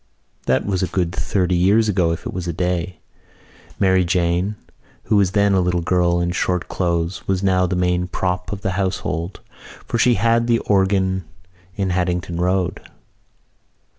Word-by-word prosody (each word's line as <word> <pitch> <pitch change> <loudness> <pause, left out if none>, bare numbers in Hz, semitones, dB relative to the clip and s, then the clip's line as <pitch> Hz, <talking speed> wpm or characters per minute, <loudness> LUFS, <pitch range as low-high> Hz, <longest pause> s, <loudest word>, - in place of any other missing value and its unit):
That 65 0 +2
was 95 -2 -1
a 95 - +1
good 90 -1 -1
thirty 90 -2 0
years 100 +6 +3
ago 90 -5 +2
if 85 - -5
it - - -4
was 90 -1 -4
a 85 - -2
day. 90 +1 -2 0.8
Mary 95 -1 +3
Jane, 90 +3 0 0.5
who 105 - +2
was 95 -2 +2
then 100 -1 +3
a 95 - +3
little 90 -1 0
girl 85 0 +2
in 85 0 0
short 90 0 -1
clothes, 85 +1 -2
was 95 0 0
now 90 -1 +3
the 90 - -1
main 90 0 +1
prop 90 +1 -2
of 100 -1 -5
the 95 - -1
household, 95 -2 -3 0.4
for 120 - -2
she 120 0 +4
had 115 +3 +2
the 120 -1 +3
organ 95 -3 +1 0.5
in 95 -2 -1
Haddington 90 -1 -1
Road. 90 0 0
90 Hz, 165 wpm, -20 LUFS, 90-95 Hz, 0.8 s, she